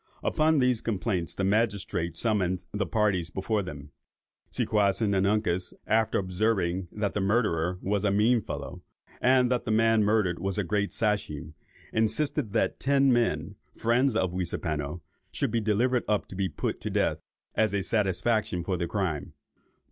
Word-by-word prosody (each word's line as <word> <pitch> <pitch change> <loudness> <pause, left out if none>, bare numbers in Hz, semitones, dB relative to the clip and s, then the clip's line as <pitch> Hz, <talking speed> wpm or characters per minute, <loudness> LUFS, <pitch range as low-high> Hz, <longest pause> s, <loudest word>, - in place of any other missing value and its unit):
Upon 155 0 +2
these 125 -3 +2
complaints, 95 -5 -2
the 95 - -2
magistrates 100 -5 0
summoned 95 -6 0
the 100 -2 -1
parties 100 -5 +1
before 100 +4 -1
them. 75 -6 -8 0.6
Seaquassin 100 0 +1
and 95 +1 +2
Uncas, 95 -4 0
after 110 +1 +2
observing 95 -2 0
that 105 -2 -2
the 105 - -1
murderer 95 -5 +1
was 100 +1 0
a 105 - +3
mean 110 +4 +3
fellow, - - -6 0.4
and 125 0 +4
that 125 - +1
the - - -3
man 115 0 +4
murdered 105 -4 +1
was 95 0 -2
a 105 - +1
great 100 +3 -1
Sachem, 100 - -2 0.4
insisted 115 +3 0
that - - 0
ten 140 -1 +3
men, 120 -1 0 0.2
friends 120 +2 +2
of 95 -5 0
Weaseapano, 85 -3 -3 0.3
should - - -1
be 115 - +1
delivered 115 +4 +1
up 105 -1 0
to - - -8
be 95 0 -1
put 75 - -3
to - - -3
death, - - 0 0.3
as 110 -2 +2
a 100 -1 -1
satisfaction 105 -1 0
for 90 0 -1
the 85 0 -2
crime. 85 -7 -2
105 Hz, 160 wpm, -28 LUFS, 90-115 Hz, 0.6 s, and